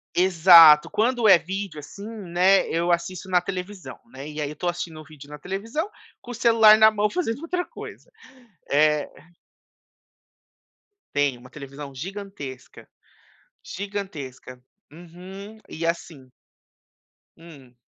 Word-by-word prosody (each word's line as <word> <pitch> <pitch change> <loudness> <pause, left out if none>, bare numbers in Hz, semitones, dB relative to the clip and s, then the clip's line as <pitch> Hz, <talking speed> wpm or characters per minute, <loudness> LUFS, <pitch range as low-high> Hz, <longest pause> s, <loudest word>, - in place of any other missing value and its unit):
Exato. 170 -4 +7
Quando 235 +1 0
é 190 -4 +8
vídeo 190 -3 -6
assim, 200 +8 -11
né, 190 -3 +1
eu 170 +1 0
assisto 175 +2 -3
na 180 -1 +3
televisão, 185 +1 -7
né, 145 - -10
e 150 0 -7
aí 145 - -3
eu - - -7
estou 175 +4 -4
assistindo 175 -2 -5
o 155 - -13
vídeo 145 -2 -15
na 150 - -9
televisão, 225 - -4 0.3
com 245 - -10
o - - -8
celular 225 -2 +6
na 220 0 +7
mão 210 0 0
fazendo 275 -4 -3
outra 355 +2 -3
coisa. - - -12 0.6
Eh 150 0 +2 2.1
Tem, 145 -3 0
uma 125 +1 -16
televisão 140 0 -10
gigantesca. 185 -5 -9 0.7
Gigantesca. 155 -11 -8 0.3
Uhum. 185 +5 -12
E, 165 +1 -5
assim 155 -6 -5 1.1
Hum. 145 -7 -16
175 Hz, 130 wpm, -23 LUFS, 150-205 Hz, 2.1 s, é